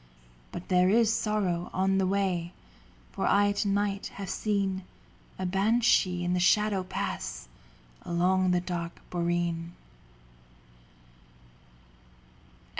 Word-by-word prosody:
But 175 - -7
there 180 0 +4
is 225 +1 +4
sorrow 190 -6 -1
on 190 +1 +2
the 190 - +2
way, 185 -3 -1 0.6
For - - -2
I 205 0 +4
to 205 +1 -1
night 200 0 0
have 195 -2 -5
seen 195 -3 -1 0.6
A 185 - -3
banshee 195 -2 +2
in 175 0 0
the 180 - +1
shadow 205 +2 +3
pass - - -4 0.5
Along 185 +2 +1
the 180 -1 +2
dark 170 -2 -5
boreen. 170 -1 -1
185 Hz, 110 wpm, -28 LUFS, 175-200 Hz, 0.6 s, there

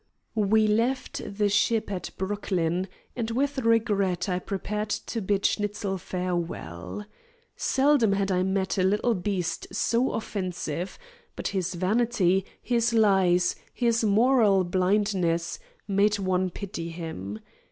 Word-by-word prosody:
We 215 0 +3
left 230 +5 0 0.2
the 210 -1 +3
ship 210 +1 +1
at 185 -2 -4
Brooklyn, 185 -3 -1 0.3
and 230 -2 -2
with 270 +4 0
regret 210 -7 +2
I 180 -1 0
prepared 210 +3 -3
to 225 +2 -3
bid 195 0 0
Schnitzel 205 -2 -1
farewell. 175 - -4 0.5
Seldom 265 -6 +3
had 195 0 0
I 180 -1 +2
met 190 +1 0
a - - +3
little 210 +5 +2
beast 180 -4 -2
so 235 +5 +1
offensive, 185 -5 -3 0.4
but - - -3
his 185 -2 -2
vanity, 195 -1 +2 0.2
his 235 -1 +1
lies, 190 -5 +4 0.2
his 235 -1 +2
moral 215 -2 +4
blindness, 185 - +1 0.3
made 205 +1 +3
one 185 -1 0
pity 175 -3 -6
him. 160 - -6
200 Hz, 120 wpm, -27 LUFS, 180-220 Hz, 0.5 s, lies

